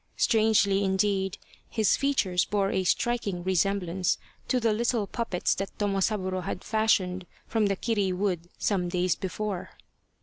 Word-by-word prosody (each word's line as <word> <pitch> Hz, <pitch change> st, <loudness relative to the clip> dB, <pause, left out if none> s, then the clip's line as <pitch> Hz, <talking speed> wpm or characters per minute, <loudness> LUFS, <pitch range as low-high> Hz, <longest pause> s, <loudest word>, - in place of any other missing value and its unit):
Strangely, 215 Hz, -3 st, +3 dB
indeed, 190 Hz, 0 st, +1 dB, 0.3 s
his 220 Hz, -3 st, +2 dB
features 200 Hz, -11 st, +1 dB
bore 200 Hz, -2 st, 0 dB
a 190 Hz, -, 0 dB
striking 205 Hz, -4 st, 0 dB
resemblance 185 Hz, -1 st, +1 dB, 0.3 s
to 255 Hz, -, +2 dB
the 225 Hz, -2 st, +2 dB
little 230 Hz, -1 st, +1 dB
puppets 205 Hz, -4 st, -1 dB
that 195 Hz, 0 st, -5 dB
Tomosaburo 195 Hz, -2 st, 0 dB
had 180 Hz, 0 st, -5 dB
fashioned 190 Hz, -5 st, +1 dB, 0.2 s
from 220 Hz, -2 st, +1 dB
the 195 Hz, -, +1 dB
kiri 205 Hz, -2 st, 0 dB
wood 180 Hz, -2 st, -2 dB
some 180 Hz, -4 st, 0 dB
days 180 Hz, 0 st, +1 dB
before. 195 Hz, 0 st, -4 dB
195 Hz, 135 wpm, -27 LUFS, 185-215 Hz, 0.3 s, Strangely